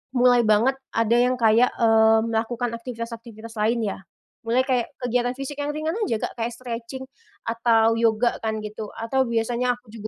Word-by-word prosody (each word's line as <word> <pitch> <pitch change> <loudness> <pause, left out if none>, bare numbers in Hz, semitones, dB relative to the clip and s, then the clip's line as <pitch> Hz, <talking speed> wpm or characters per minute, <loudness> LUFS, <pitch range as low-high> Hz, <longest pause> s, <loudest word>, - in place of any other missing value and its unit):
mulai 245 0 +5
banget 220 +5 +3 0.2
ada 230 +1 +2
yang 250 +1 +3
kayak, 230 +2 +4
eee, 225 -1 +5
melakukan 230 +1 -1
aktivitas-aktivitas 230 -1 -8
lain 230 +2 +1
ya. 205 - -3 0.5
Mulai 245 +3 +3
kayak 250 -3 +1
kegiatan 245 0 0
fisik 275 +2 -6
yang 290 +1 -1
ringan 310 +1 -2 0.2
aja, 230 -3 0
Kak, - - -3
kayak 230 +1 -1
stretching 245 +1 -6 0.4
atau 230 -1 +3
yoga 230 +1 +2
kan 220 -1 -1
gitu, 210 0 -6
atau 245 +4 0
biasanya 235 +2 0
aku 245 -3 -20
juga, 215 -1 -7
230 Hz, 165 wpm, -24 LUFS, 225-245 Hz, 0.5 s, mulai